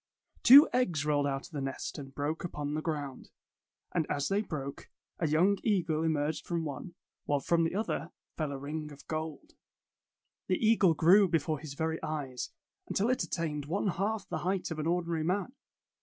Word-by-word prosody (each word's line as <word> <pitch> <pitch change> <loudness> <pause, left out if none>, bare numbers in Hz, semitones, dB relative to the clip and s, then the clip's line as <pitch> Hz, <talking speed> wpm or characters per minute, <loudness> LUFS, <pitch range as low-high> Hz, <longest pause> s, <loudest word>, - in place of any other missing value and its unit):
Two 280 +4 +10
eggs 175 - +1
rolled 145 -1 +2
out 135 0 -2
of 175 - -13
the 145 -3 -4
nest 135 +3 -4
and 135 -1 -10
broke 150 +3 -2
upon 150 -4 -3
the 155 - -1
ground; 145 -5 -4 0.6
and 160 -3 0
as 145 -1 0
they 200 +1 +2
broke, 140 -8 -6 0.3
a 165 - +1
young 180 +6 +3
eagle 175 -8 +1
emerged 155 -1 -1
from 170 -2 -1
one, 155 +4 -6 0.3
while 145 -1 +1
from 165 +4 +2
the 165 - -2
other 210 -5 -2 0.3
fell 155 -3 -2
a 140 - -4
ring 150 +2 -5
of 145 0 -13
gold. 155 -1 -5 0.9
The 185 - +2
eagle 215 -7 +4
grew 190 +6 +6
before 155 -3 0
his 145 -2 -8
very 160 +1 -2
eyes, 145 -5 -4 0.4
until 220 +6 +1
it 255 - 0
attained 150 -4 -2
one 195 +5 0
half 200 +4 -1
the - - -3
height 185 -1 -1
of 160 - -4
an 155 - -1
ordinary 170 -2 0
man. 190 +8 -1
160 Hz, 185 wpm, -31 LUFS, 145-180 Hz, 0.9 s, Two